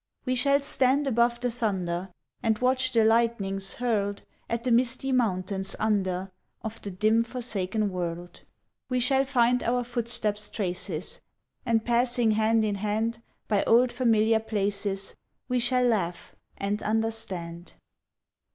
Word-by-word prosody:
We 255 - +1
shall 280 +3 +3
stand 275 +1 +2
above 235 -2 +2
the 245 -1 0
thunder, 190 -6 -2 0.3
And 220 -1 +1
watch 255 +2 +2
the 225 -2 +4
lightnings 220 -4 +1
hurled 205 -5 -1 0.3
At 235 0 -2
the 250 - 0
misty 255 +3 +2
mountains 190 -5 -1
under, 190 -3 0 0.3
Of 220 0 -6
the 200 - -5
dim 215 +4 +2
forsaken 220 -4 -2
world. 175 -1 -5 0.5
We 255 -1 +1
shall 265 +2 +3
find 250 -2 +2
our 245 +1 0
footsteps' 225 -3 -3
traces, 180 -4 -4 0.5
And 225 -1 +2
passing 240 -1 +2
hand 220 +1 +2
in 205 -1 0
hand 220 +2 -1 0.3
By 205 -2 +2
old 240 +2 +5
familiar 225 -3 +3
places, 200 -2 -2 0.3
We 250 -1 +1
shall 250 +1 +2
laugh, 195 -8 -1 0.2
and 200 +1 -2
understand. 195 -6 -2
1881. - - -37
225 Hz, 135 wpm, -27 LUFS, 200-245 Hz, 0.5 s, old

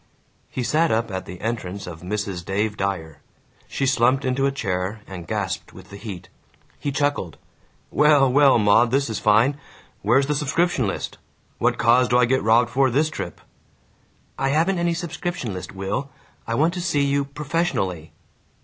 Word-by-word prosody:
He 130 - -3
sat 160 +6 +2
up 115 0 0
at 95 0 -5
the 90 - -8
entrance 100 -4 -4
of 80 -2 -9
Mrs. 95 -1 -3
Dave 105 +3 -1
Dyer. 95 -6 -3 0.5
She 135 - -2
slumped 130 +1 +2
into 135 +1 +1
a - - 0
chair 100 -4 -3
and 90 -3 -9
gasped 100 -3 -3
with 95 +1 -14
the - - -8
heat. 100 -4 -8 0.5
He 145 - -2
chuckled, 140 - -1 0.5
"Well, 150 -2 +5
well, 140 -2 +6
Maud, 115 +2 +4
this 135 -1 +1
is 110 - -2
fine. 115 +7 +3 0.4
Where's 120 +7 +3
the 150 - 0
subscription 150 - +1
list? 95 - -4 0.4
What - - +2
cause 120 +2 +4
do 125 - +3
I 125 - +5
get 130 +2 +1
robbed 115 +2 +3
for, 135 +1 +3
this 150 +6 +1
trip?" - - -6 1.0
"I 135 0 +1
haven't 170 +6 +2
any 170 0 +1
subscription 170 - -4
list, 90 - -7
Will. 100 +9 -3 0.4
I 115 - -1
want 160 +7 +2
to 180 - -4
see 155 -5 +1
you 140 0 +1
professionally." 140 - -2
120 Hz, 170 wpm, -23 LUFS, 100-140 Hz, 1.0 s, well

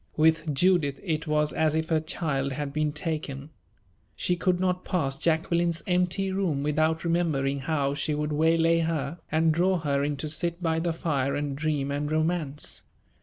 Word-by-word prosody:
With 160 0 +3
Judith 155 -4 +3
it 160 -4 -2
was 150 0 +1
as 155 -1 +1
if 160 0 -1
her 160 -1 +3
child 140 -4 -2
had 140 0 -4
been 155 0 0
taken. 150 -2 -4 0.6
She 180 - 0
could 180 +1 +1
not 180 0 0
pass 155 -8 -1
Jacqueline's 170 +2 +1
empty 180 +2 +1
room 180 -8 0
without 155 +2 +1
remembering 155 -5 0
how 140 -1 0
she 150 +1 -1
would 150 0 -2
waylay 165 +2 +3
her, 160 -1 -2
and 160 +1 +3
draw 180 +3 +2
her 140 -4 0
in 145 0 -1
to 155 - -4
sit 170 +3 -1
by 165 -2 0
the 170 +1 0
fire 140 -4 -1
and 145 -1 -2
dream 145 -2 -1
and 145 +1 -2
romance. 155 -2 -1
155 Hz, 170 wpm, -27 LUFS, 145-170 Hz, 0.6 s, With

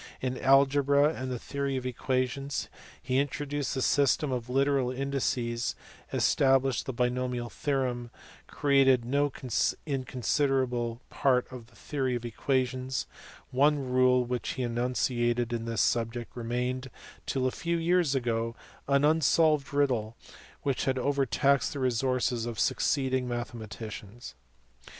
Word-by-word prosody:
In 130 0 -2
algebra 140 +2 +4
and 130 -2 -5
the 125 - -2
theory 140 +2 -3
of 130 - -5
equations, 130 +2 -2 0.3
he 130 +1 +1
introduced 145 0 -2
the 130 - 0
system 140 0 +2
of 125 -1 -3
literal 135 0 +2
indices, 125 -3 -1 0.4
established 135 -1 +2
the - - -1
binomial 125 0 -1
theorem, 125 -4 -2
and - - -22
created 135 -4 +3
no 140 +3 +1 0.5
in 135 -4 -2
considerable 125 -2 0
part 125 -2 +2
of 125 -3 -9
the 120 - -23
theory 135 -3 -2
of 120 0 -4
equations: 130 +1 -1 0.5
one 145 +3 +4
rule 125 0 +4
which 125 -1 -3
he 130 - -3
enunciated 120 0 0
in 115 -1 -2
this 115 -1 0
subject 115 0 -1
remained 125 +2 -2 0.4
till 130 -1 0
a 130 - +2
few 170 +4 -2
years 170 -3 +2
ago 115 -2 -1 0.3
as 140 - +4
an 140 +1 +4
unsolved 155 -1 +3
riddle 125 -6 0 0.5
which 140 -2 0
had 130 -1 +1
overtaxed 140 0 +1
the 140 - -5
resources 125 -1 0
of 115 -4 -5
succeeding 130 +1 +1
mathematicians. 115 -2 -6
130 Hz, 130 wpm, -29 LUFS, 120-140 Hz, 0.5 s, algebra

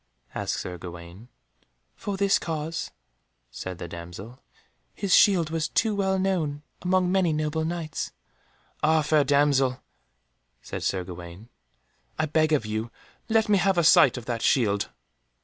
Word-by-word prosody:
asked - - -2
Sir 90 -1 -6
Gawaine. 85 +5 -10 0.7
"For 200 -1 -4
this 200 0 +3
cause," 160 0 -4 0.6
said 90 +7 -6
the 85 - -6
damsel, 90 +8 -9 0.6
"his 195 -3 0
shield 175 -6 +5
was 160 -2 0
too 220 +6 +1
well 190 -1 +1
known 165 -7 -1 0.2
among 180 0 +2
many 185 -3 +2
noble 155 +1 -1
Knights." 165 -1 -3 0.7
"Ah, 155 0 +3
fair 150 0 +3
damsel," 140 -2 +2 0.8
said - - -7
Sir 95 -2 -1
Gawaine, 90 +4 -10 0.7
"I 155 - +1
beg 155 +1 +1
of 145 -7 +2
you 110 +2 -3 0.4
to 225 - -3
let 220 -1 +4
me 205 -2 +4
have 195 0 +2
a 170 - +4
sight 135 -5 +6
of 120 - -7
that 120 -2 -3
shield." 105 -6 +2
150 Hz, 150 wpm, -26 LUFS, 110-175 Hz, 0.8 s, sight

